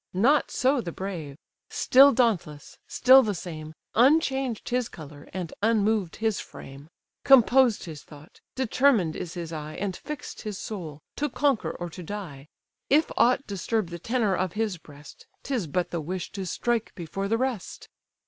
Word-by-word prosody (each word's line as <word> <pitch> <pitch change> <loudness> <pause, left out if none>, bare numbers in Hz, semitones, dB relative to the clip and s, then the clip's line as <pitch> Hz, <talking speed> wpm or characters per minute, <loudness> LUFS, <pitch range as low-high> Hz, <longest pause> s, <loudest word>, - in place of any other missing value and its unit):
Not 270 +10 +3
so 265 0 +1
the 175 - -5
brave—still 190 - +2
dauntless, 195 - -1
still 260 +2 +6
the 210 -5 -1
same, 155 -3 -7 0.2
Unchanged 265 -2 +2
his 250 -1 0
colour, 145 -2 -12
and 180 -4 -5
unmoved 215 -4 +1
his 220 -2 -1
frame: 140 +3 -11 0.3
Composed 255 -2 +5
his 155 -3 -8
thought, 150 +1 -16
determined 250 - +2
is 170 - -6
his 170 -2 -6
eye, 155 0 -6
And 195 -3 -3
fix'd 300 +3 -7
his 210 -3 -5
soul, 160 -10 -7
to 295 +1 -1
conquer 275 -2 +1
or 175 - -6
to 180 - -9
die: 165 -7 -7 0.4
If 305 +3 +3
aught 250 +3 +3
disturb 200 0 -2
the 170 0 -7
tenour 225 0 0
of 185 -2 -1
his 210 -5 -2
breast, 145 -1 -15 0.2
'Tis 250 - -2
but 175 +4 -2
the 170 - -2
wish 180 +4 -5
to 195 -2 -5
strike 235 +5 -1
before 190 +3 -4
the 225 +3 +1
rest. 250 -6 -4
200 Hz, 160 wpm, -26 LUFS, 165-245 Hz, 0.4 s, still